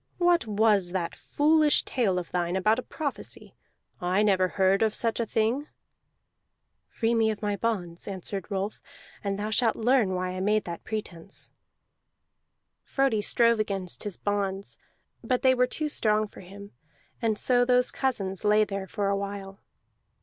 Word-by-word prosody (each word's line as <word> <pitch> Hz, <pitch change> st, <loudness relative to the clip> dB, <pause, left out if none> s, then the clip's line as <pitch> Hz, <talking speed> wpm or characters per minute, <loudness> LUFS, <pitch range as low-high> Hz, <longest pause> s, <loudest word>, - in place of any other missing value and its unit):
What 350 Hz, -8 st, +3 dB
was 205 Hz, -4 st, +2 dB
that 175 Hz, -3 st, -2 dB
foolish 305 Hz, 0 st, +3 dB
tale 210 Hz, -8 st, 0 dB
of 175 Hz, -2 st, -4 dB
thine 175 Hz, 0 st, -1 dB
about 215 Hz, +5 st, +2 dB
a -, -, -2 dB
prophecy? 290 Hz, +1 st, -6 dB, 0.5 s
I 185 Hz, +4 st, +2 dB
never 190 Hz, -3 st, +3 dB
heard 190 Hz, +2 st, +2 dB
of 220 Hz, -1 st, +2 dB
such 230 Hz, 0 st, 0 dB
a 230 Hz, -, -1 dB
thing." 230 Hz, +8 st, 0 dB, 1.2 s
"Free 230 Hz, 0 st, -1 dB
me 225 Hz, -1 st, +3 dB
of 215 Hz, 0 st, -4 dB
my 205 Hz, -1 st, 0 dB
bonds," 185 Hz, -7 st, -3 dB
answered 195 Hz, 0 st, -5 dB
Rolf, 200 Hz, +1 st, -3 dB, 0.4 s
"and 200 Hz, -1 st, -1 dB
thou 210 Hz, +1 st, -3 dB
shalt 225 Hz, 0 st, +2 dB
learn 225 Hz, -5 st, +2 dB
why 185 Hz, 0 st, -2 dB
I 185 Hz, -, -5 dB
made 210 Hz, +3 st, +2 dB
that 170 Hz, -1 st, -7 dB
pretence." 195 Hz, -4 st, -6 dB, 1.3 s
Frodi 270 Hz, -6 st, +1 dB
strove 230 Hz, +2 st, +3 dB
against 195 Hz, -4 st, -2 dB
his 205 Hz, -4 st, -4 dB
bonds, 200 Hz, -1 st, -2 dB, 0.4 s
but 255 Hz, -2 st, 0 dB
they 260 Hz, -1 st, +6 dB
were 250 Hz, 0 st, +2 dB
too 305 Hz, +4 st, -2 dB
strong 215 Hz, -7 st, +2 dB
for -, -, -14 dB
him; 200 Hz, +2 st, -11 dB, 0.5 s
and 220 Hz, -2 st, +1 dB
so 245 Hz, +1 st, +3 dB
those 250 Hz, 0 st, +3 dB
cousins 195 Hz, -8 st, -2 dB
lay 210 Hz, +1 st, +4 dB
there 195 Hz, -2 st, -4 dB
for 200 Hz, +1 st, -2 dB
a 200 Hz, -, +2 dB
while. 195 Hz, 0 st, -5 dB
210 Hz, 160 wpm, -27 LUFS, 195-230 Hz, 1.3 s, they